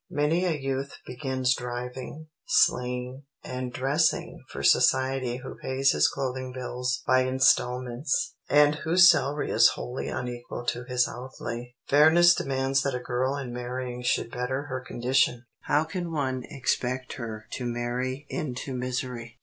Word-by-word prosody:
Many 160 Hz, +5 st, +1 dB
a 165 Hz, -4 st, 0 dB
youth 135 Hz, 0 st, -3 dB
begins 130 Hz, 0 st, 0 dB
driving, 125 Hz, +5 st, -6 dB, 0.2 s
sleighing, 125 Hz, +2 st, +1 dB, 0.2 s
and 125 Hz, -1 st, -5 dB
dressing 140 Hz, +6 st, 0 dB
for 65 Hz, -, -6 dB
society 130 Hz, -, +3 dB
who -, -, -8 dB
pays 135 Hz, +1 st, +2 dB
his -, -, +4 dB
clothing 130 Hz, -1 st, -3 dB
bills 125 Hz, -1 st, -3 dB
by 130 Hz, 0 st, +4 dB
instalments, 130 Hz, -, +1 dB, 0.2 s
and 145 Hz, 0 st, +5 dB
whose 175 Hz, +2 st, +7 dB
salary 145 Hz, -2 st, +2 dB
is -, -, +6 dB
wholly 125 Hz, +2 st, -5 dB
unequal 120 Hz, -1 st, -5 dB
to 120 Hz, +1 st, -4 dB
his 125 Hz, -1 st, +1 dB
outlay. 120 Hz, -1 st, -7 dB
Fairness 160 Hz, +4 st, +6 dB
demands 135 Hz, -2 st, 0 dB
that 140 Hz, -2 st, -1 dB
a -, -, -2 dB
girl 130 Hz, +2 st, -1 dB
in 130 Hz, -4 st, -5 dB
marrying 125 Hz, 0 st, -4 dB
should 125 Hz, -1 st, 0 dB
better 130 Hz, +3 st, -2 dB
her 130 Hz, -3 st, -4 dB
condition. 125 Hz, 0 st, +1 dB, 0.2 s
How 150 Hz, +1 st, +3 dB
can 170 Hz, +1 st, -5 dB
one 130 Hz, -5 st, -2 dB
expect 130 Hz, -1 st, -2 dB
her 110 Hz, -4 st, -6 dB
to 125 Hz, -, -4 dB
marry 125 Hz, +3 st, -3 dB
into 130 Hz, -2 st, -4 dB
misery? 125 Hz, -2 st, -4 dB
130 Hz, 140 wpm, -27 LUFS, 125-135 Hz, 0.2 s, whose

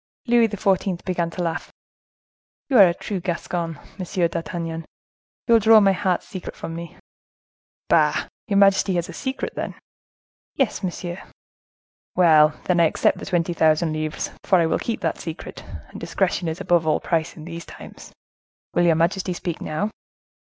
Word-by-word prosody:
Louis 235 Hz, -2 st, +4 dB
XIV. 195 Hz, -3 st, 0 dB
began 175 Hz, -3 st, -1 dB
to 175 Hz, +1 st, -4 dB
laugh. 165 Hz, -1 st, -3 dB, 1.0 s
"You 250 Hz, -, +6 dB
are 195 Hz, -, +10 dB
a 170 Hz, -, +1 dB
true 200 Hz, 0 st, -4 dB
Gascon, 170 Hz, -2 st, -3 dB, 0.2 s
Monsieur 180 Hz, -1 st, 0 dB
d'Artagnan; 165 Hz, 0 st, -4 dB, 0.6 s
you 235 Hz, -, +3 dB
will 230 Hz, -, +7 dB
draw 220 Hz, +1 st, +7 dB
my 200 Hz, -2 st, +5 dB
heart's 185 Hz, -2 st, -1 dB
secret 185 Hz, -, -7 dB
from 165 Hz, -, -6 dB
me." 170 Hz, 0 st, -8 dB, 0.9 s
"Bah! -, -, +4 dB
has -, -, -3 dB, 0.2 s
your 200 Hz, -2 st, +1 dB
majesty 195 Hz, -2 st, +4 dB
a 170 Hz, -, +1 dB
secret, 265 Hz, +9 st, -4 dB
then?" -, -, -4 dB, 0.8 s
"Yes, 265 Hz, -7 st, 0 dB
monsieur." 175 Hz, -1 st, -4 dB, 0.9 s
"Well! 155 Hz, -4 st, +5 dB
then 180 Hz, -1 st, +1 dB
I 170 Hz, -, +6 dB
accept 155 Hz, -, +1 dB
the -, -, -8 dB
twenty 175 Hz, -1 st, 0 dB
thousand 160 Hz, 0 st, +2 dB
livres, 155 Hz, 0 st, -3 dB
for 190 Hz, -, +4 dB
I 170 Hz, -, +3 dB
will 160 Hz, -, 0 dB
keep 230 Hz, -, -3 dB
that -, -, -1 dB
secret, 165 Hz, 0 st, -7 dB, 0.3 s
and -, -, -9 dB
discretion 185 Hz, -2 st, -1 dB
is 160 Hz, +1 st, -3 dB
above 170 Hz, -2 st, +2 dB
all 155 Hz, -, +3 dB
price, 165 Hz, -1 st, -1 dB
in 155 Hz, -, -9 dB
these 170 Hz, 0 st, -8 dB
times. -, -, -12 dB, 0.6 s
Will 175 Hz, -, +3 dB
your 165 Hz, -, +5 dB
majesty 180 Hz, +3 st, 0 dB
speak 175 Hz, -1 st, -5 dB
now?" 200 Hz, +8 st, -2 dB
175 Hz, 165 wpm, -23 LUFS, 165-195 Hz, 1.0 s, are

